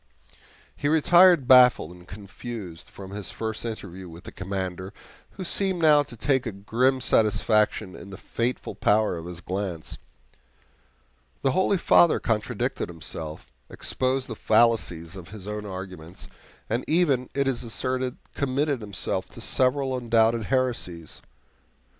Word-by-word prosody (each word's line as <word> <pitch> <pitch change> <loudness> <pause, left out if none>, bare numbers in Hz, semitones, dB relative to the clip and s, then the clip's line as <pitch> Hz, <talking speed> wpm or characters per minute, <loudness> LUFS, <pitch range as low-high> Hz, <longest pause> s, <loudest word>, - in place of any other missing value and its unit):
He 145 - -2
retired 170 -1 +5
baffled 125 -9 +6
and 90 0 -15
confused 100 -2 -8
from 95 -1 -10
his 100 -3 -4
first 110 -1 -4
interview 95 -5 -7
with 85 +2 -12
the - - -9
Commander, 95 -1 -5 0.4
who 190 - -6
seemed 190 0 0
now 155 -3 +6
to 130 -5 -8
take 130 0 +1
a - - -2
grim 120 +7 0
satisfaction 105 -3 +2
in 100 - -11
the 95 - -9
fateful 120 +2 -3
power 105 -2 +2
of 85 0 -7
his 90 0 -7
glance. 90 -4 -4 1.4
The 135 - +3
holy 190 +5 +2
Father 170 -1 +5
contradicted 115 +2 -2
himself, 80 -1 -7 0.2
exposed 130 0 -1
the 110 - -6
fallacies 100 -8 +1
of 90 -3 -10
his 100 -2 -10
own 105 0 -5
arguments, 95 -3 -8 0.4
and 115 +3 -1
even, 145 -7 +2
it 140 -1 +1
is 130 -3 -1
asserted, 130 +2 -2 0.2
committed 140 -1 -1
himself 105 -2 -3
to - - -10
several 130 0 +1
undoubted 115 -2 +2
heresies. 120 - -2
115 Hz, 135 wpm, -25 LUFS, 95-130 Hz, 1.4 s, baffled